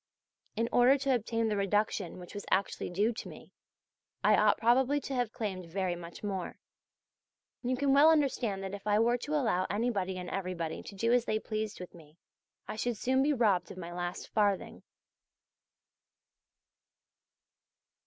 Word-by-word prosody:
In 230 Hz, +2 st, 0 dB
order 250 Hz, +3 st, +5 dB
to 275 Hz, -1 st, +1 dB
obtain 230 Hz, -1 st, 0 dB
the 215 Hz, -, 0 dB
reduction 200 Hz, -3 st, 0 dB
which 180 Hz, -1 st, -10 dB
was 205 Hz, -1 st, -6 dB
actually 195 Hz, +1 st, 0 dB
due 205 Hz, +6 st, +1 dB
to -, -, -7 dB
me -, -, -13 dB, 0.7 s
I -, -, +6 dB
ought -, -, +4 dB
probably 260 Hz, +5 st, +3 dB
to 275 Hz, -, -6 dB
have 245 Hz, -4 st, 0 dB
claimed 190 Hz, -6 st, -4 dB
very 185 Hz, -1 st, -1 dB
much 170 Hz, +2 st, -10 dB
more. 195 Hz, -3 st, -4 dB, 1.0 s
You 255 Hz, 0 st, -1 dB
can 280 Hz, 0 st, +2 dB
well 290 Hz, +3 st, +7 dB
understand 255 Hz, -10 st, +1 dB
that 195 Hz, 0 st, -5 dB
if 200 Hz, +1 st, -7 dB
I 210 Hz, 0 st, +3 dB
were 235 Hz, +2 st, +3 dB
to 300 Hz, +5 st, -3 dB
allow 220 Hz, -10 st, +1 dB
anybody 200 Hz, -4 st, -1 dB
and 180 Hz, -1 st, -6 dB
everybody 180 Hz, -4 st, -3 dB
to 200 Hz, -, -10 dB
do 230 Hz, +4 st, +1 dB
as 245 Hz, -1 st, +3 dB
they 215 Hz, -, 0 dB
pleased 215 Hz, -1 st, -4 dB
with 180 Hz, -, -9 dB
me, 160 Hz, -2 st, -16 dB, 0.5 s
I -, -, -5 dB
should 240 Hz, 0 st, -1 dB
soon 260 Hz, +5 st, +1 dB
be 290 Hz, +2 st, +3 dB
robbed 215 Hz, -9 st, +2 dB
of -, -, -9 dB
my 175 Hz, -1 st, -7 dB
last 175 Hz, 0 st, -4 dB
farthing. 205 Hz, -3 st, 0 dB
210 Hz, 165 wpm, -31 LUFS, 185-245 Hz, 1.0 s, well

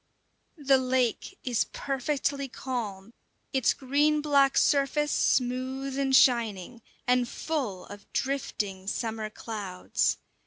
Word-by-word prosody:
The 275 Hz, -3 st, +4 dB
lake 255 Hz, -, 0 dB
is 245 Hz, -3 st, +1 dB
perfectly 280 Hz, +1 st, -1 dB
calm, 230 Hz, -6 st, -5 dB, 0.4 s
its 265 Hz, -1 st, +3 dB
green 290 Hz, +3 st, +2 dB
black 280 Hz, -2 st, +3 dB
surface 295 Hz, +1 st, +2 dB
smooth 260 Hz, +2 st, 0 dB
and 270 Hz, -1 st, +2 dB
shining, 235 Hz, -3 st, +3 dB, 0.2 s
and 250 Hz, -1 st, +2 dB
full 255 Hz, -, -3 dB
of 205 Hz, 0 st, -12 dB
drifting 205 Hz, -8 st, -2 dB
summer 220 Hz, 0 st, -2 dB
clouds. 205 Hz, -4 st, -2 dB
255 Hz, 105 wpm, -28 LUFS, 225-275 Hz, 0.4 s, The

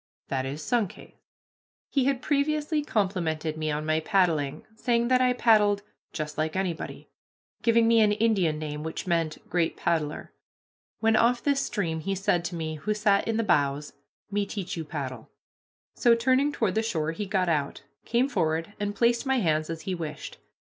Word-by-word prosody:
That 135 Hz, -1 st, -1 dB
is 145 Hz, +3 st, -5 dB
Sunkhaze." 225 Hz, -3 st, -2 dB, 0.8 s
He 270 Hz, -3 st, +2 dB
had 270 Hz, -2 st, 0 dB
previously 300 Hz, +1 st, +1 dB
complimented 175 Hz, -, -1 dB
me 155 Hz, 0 st, -2 dB
on 150 Hz, 0 st, -2 dB
my 155 Hz, 0 st, +2 dB
paddling, 160 Hz, -6 st, +1 dB
saying 235 Hz, +1 st, +1 dB
that 255 Hz, 0 st, +4 dB
I 250 Hz, -1 st, +4 dB
paddled 210 Hz, -4 st, +3 dB, 0.3 s
"just 155 Hz, -1 st, -5 dB
like 155 Hz, 0 st, -1 dB
anybody," 185 Hz, -3 st, -4 dB, 0.5 s
giving 230 Hz, -1 st, +4 dB
me 230 Hz, -1 st, +5 dB
an 210 Hz, -1 st, +4 dB
Indian 205 Hz, -8 st, +2 dB
name 150 Hz, -1 st, -5 dB
which 160 Hz, +1 st, -5 dB
meant 165 Hz, -3 st, -1 dB
"great 170 Hz, -2 st, 0 dB
paddler." 155 Hz, -3 st, -2 dB, 0.7 s
When 225 Hz, 0 st, +4 dB
off 235 Hz, +2 st, +3 dB
this 280 Hz, -1 st, +2 dB
stream 170 Hz, -7 st, -2 dB
he 195 Hz, +5 st, -2 dB
said 190 Hz, -2 st, +1 dB
to 175 Hz, -, -3 dB
me, 155 Hz, -1 st, -4 dB
who 210 Hz, +7 st, -2 dB
sat 205 Hz, -1 st, +2 dB
in 225 Hz, -1 st, 0 dB
the 230 Hz, -, +1 dB
bows, 145 Hz, -6 st, +1 dB, 0.4 s
"Me 205 Hz, 0 st, +1 dB
teach 195 Hz, -4 st, -4 dB
you 165 Hz, -, -4 dB
paddle." 135 Hz, -6 st, -6 dB, 0.6 s
So, 235 Hz, -1 st, +4 dB
turning 260 Hz, +5 st, +2 dB
toward 220 Hz, -9 st, 0 dB
the 220 Hz, -, +1 dB
shore, 160 Hz, -9 st, -1 dB
he 200 Hz, +5 st, -5 dB
got 190 Hz, -1 st, +1 dB
out, 150 Hz, -4 st, -1 dB, 0.2 s
came 240 Hz, +3 st, +1 dB
forward, 165 Hz, -, -1 dB
and 205 Hz, 0 st, -2 dB
placed 235 Hz, +4 st, +2 dB
my 265 Hz, 0 st, +2 dB
hands 155 Hz, -7 st, +1 dB
as 165 Hz, -1 st, -4 dB
he 190 Hz, -, -3 dB
wished. 155 Hz, -4 st, -6 dB
190 Hz, 175 wpm, -27 LUFS, 155-230 Hz, 0.8 s, me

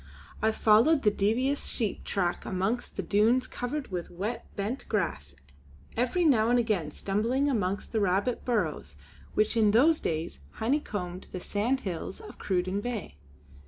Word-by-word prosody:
I 220 Hz, +1 st, +3 dB
followed 230 Hz, +8 st, +4 dB
the 210 Hz, -, +5 dB
devious 245 Hz, +8 st, +1 dB
sheep 220 Hz, -6 st, -1 dB
track 180 Hz, -3 st, -1 dB
amongst 195 Hz, +6 st, -2 dB
the 195 Hz, -, -1 dB
dunes 220 Hz, +8 st, +3 dB
covered 265 Hz, +3 st, -4 dB
with 175 Hz, -2 st, -4 dB
wet 205 Hz, +7 st, -4 dB
bent 215 Hz, +6 st, -4 dB
grass, 75 Hz, -, -2 dB, 0.6 s
every 255 Hz, +9 st, +1 dB
now 235 Hz, -7 st, +4 dB
and 245 Hz, -, +4 dB
again 215 Hz, -10 st, 0 dB
stumbling 225 Hz, -, 0 dB
amongst 200 Hz, -7 st, -1 dB
the 225 Hz, -, +1 dB
rabbit 200 Hz, +5 st, +1 dB
burrows 160 Hz, -, -1 dB, 0.4 s
which 215 Hz, +2 st, +2 dB
in 220 Hz, -2 st, +4 dB
those 285 Hz, +10 st, +5 dB
days 160 Hz, -, -3 dB
honeycombed 205 Hz, -8 st, -2 dB
the 185 Hz, -, -4 dB
sandhills 205 Hz, -3 st, -2 dB
of -, -, -12 dB
Cruden 185 Hz, +1 st, -1 dB
Bay. 225 Hz, -, -5 dB
215 Hz, 145 wpm, -29 LUFS, 185-245 Hz, 0.6 s, the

